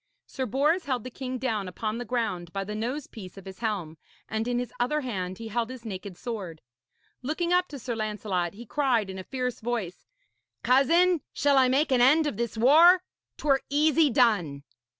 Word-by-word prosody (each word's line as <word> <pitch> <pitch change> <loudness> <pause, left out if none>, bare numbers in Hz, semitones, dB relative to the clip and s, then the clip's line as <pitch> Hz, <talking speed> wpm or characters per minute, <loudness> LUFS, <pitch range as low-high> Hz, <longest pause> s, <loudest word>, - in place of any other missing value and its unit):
Sir 260 -2 -4
Bors 295 - +1
held 255 -5 -1
the 255 - -7
king 255 0 -5
down 225 -6 -2
upon 215 +5 -4
the 245 - -5
ground 205 -9 -2
by 195 +1 -3
the 210 +2 -6
nose 245 +7 -3
piece 190 -4 -11
of 195 - -11
his 190 -1 -10
helm, 185 -9 -3 0.3
and 220 +1 -2
in 245 -1 0
his 245 -1 -3
other 300 +5 +1
hand 185 -8 -4
he 225 -1 -7
held 230 +1 -1
his 255 -2 -9
naked 195 -3 -7
sword. 195 -10 -6 0.6
Looking 330 +6 -1
up 360 0 +3
to 285 - -8
Sir 245 -2 -4
Lancelot, 210 -5 -2
he 235 +3 -10
cried 235 -6 0
in 190 - -7
a - - -6
fierce 250 +1 -3
voice: 220 -6 -4 0.6
'Cousin, 325 +7 +4
shall 285 -1 +2
I 260 - +5
make 275 +4 +2
an 250 -2 +4
end 300 +6 +5
of 285 -9 -2
this 235 -1 -3
war? 330 +10 +6 0.3
'Twere 275 -2 +2
easy 300 +1 +3
done.' 190 - +2
240 Hz, 195 wpm, -27 LUFS, 205-275 Hz, 0.6 s, war